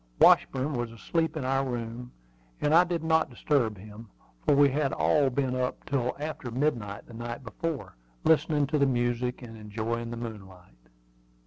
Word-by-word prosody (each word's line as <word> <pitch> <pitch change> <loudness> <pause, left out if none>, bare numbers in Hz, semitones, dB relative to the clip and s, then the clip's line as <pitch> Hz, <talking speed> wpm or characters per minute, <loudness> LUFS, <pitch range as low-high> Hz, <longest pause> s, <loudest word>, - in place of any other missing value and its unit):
Washburn 135 +3 +5
was 120 -2 -2
asleep 160 +7 -1
in 140 - -3
our 135 +1 +1
room, 120 -1 -5 0.5
and 150 - +1
I 170 +2 +8
did 175 -2 -2
not 160 -1 +2
disturb 120 -4 0
him, 105 +3 -11 0.3
for - - +4
we 145 0 +6
had 140 0 0
all 145 -3 +3
been 130 0 -1
up 125 0 -2
till 125 -3 -1
after 150 -4 -5
midnight 115 -6 -1
the 120 - -14
night 120 +2 -6
before, 150 +5 -5 0.3
listening 150 -2 +3
to 150 +2 0
the 140 - +4
music, 120 0 -1
and 115 -2 -9
enjoying 110 +2 -4
the 120 - -5
moonlight. 95 - -10
125 Hz, 170 wpm, -28 LUFS, 115-145 Hz, 0.5 s, I